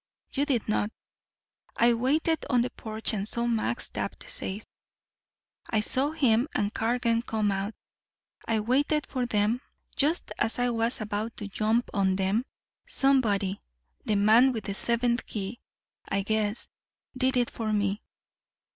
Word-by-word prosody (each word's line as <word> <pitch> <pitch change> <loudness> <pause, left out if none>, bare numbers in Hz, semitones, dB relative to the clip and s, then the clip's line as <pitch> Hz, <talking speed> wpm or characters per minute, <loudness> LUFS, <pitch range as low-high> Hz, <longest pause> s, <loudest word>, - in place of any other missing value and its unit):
You 285 +1 +1
did 250 -7 0
not. 215 -1 +1 0.9
I 235 +1 +5
waited 300 +7 +1
on 245 -3 +4
the 250 - -3
porch 220 +1 -3
and 200 -1 -2
saw 235 +2 0
Max 235 0 0
tap - - -3
the - - -12
safe. 200 +3 -3 1.0
I 220 - +2
saw 265 +6 +1
him 260 -5 +2
and 205 0 0
Cargan 230 0 +1
come 215 -3 0
out. 195 +2 -2 0.7
I 225 -1 +1
waited 285 +6 +1
for 250 -2 -2
them. 215 +2 +1 0.3
Just 310 +5 +1
as 225 - +1
I 245 0 +1
was 230 +1 0
about 215 +1 -3
to 205 - -5
jump 220 +4 0
on 190 -2 +2
them, 195 +6 +1 0.4
somebody 225 - +2 0.4
the 215 - 0
man 225 +6 +5
with 220 -3 -4
the 200 - -3
seventh 235 +3 +1
key, 210 +3 -4 0.5
I 195 0 0
guess 215 +1 -1 0.5
did 260 0 +2
it 245 -1 +1
for 220 -2 -3
me. 205 0 0
225 Hz, 150 wpm, -28 LUFS, 210-250 Hz, 1.0 s, I